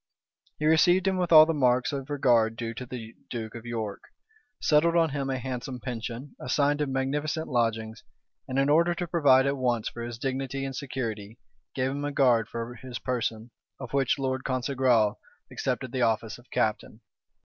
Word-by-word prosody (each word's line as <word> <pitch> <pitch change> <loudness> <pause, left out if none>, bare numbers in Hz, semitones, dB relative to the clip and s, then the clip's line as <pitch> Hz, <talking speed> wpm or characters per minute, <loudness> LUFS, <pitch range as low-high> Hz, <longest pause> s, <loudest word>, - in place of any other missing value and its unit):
He 150 - -2
received 175 +4 +4
him 190 -1 +1
with 180 -2 -1
all 155 -1 +10
the 165 - 0
marks 125 -3 +2
of 135 0 -5
regard 120 -6 +3
due 115 0 -4
to 125 +2 -7
the 115 -2 -8 0.2
duke 110 -3 -5
of 120 0 -9
York; 110 -4 -4 0.6
settled 160 +3 +3
on 165 -1 +4
him 135 -1 -2
a 135 - -1
handsome 125 0 -5
pension, 125 +2 -6
assigned 145 +3 +1
him 145 -2 -1
magnificent 145 +4 -1
lodgings, 115 -3 -1 0.5
and 130 -1 -3
in 135 0 +3
order 170 +4 +3
to 175 - -3
provide 145 -6 +4
at 140 0 0
once 120 -4 0
for 120 - -9
his 120 0 -5
dignity 135 +1 -3
and 135 -1 -5
security, 115 -6 -5 0.4
gave 130 0 0
him 145 +1 -4
a 145 - -2
guard 125 -6 +3
for 115 +1 -5
his 125 0 -8
person, 115 -2 -3 0.3
of 130 -2 -8
which 135 -1 +2
Lord 130 -1 -2
Congresal 130 -4 +1 0.3
accepted 130 -1 -2
the 130 -1 -2
office 115 -1 0
of 120 - -21
captain. 110 0 -1
130 Hz, 180 wpm, -27 LUFS, 115-140 Hz, 0.6 s, all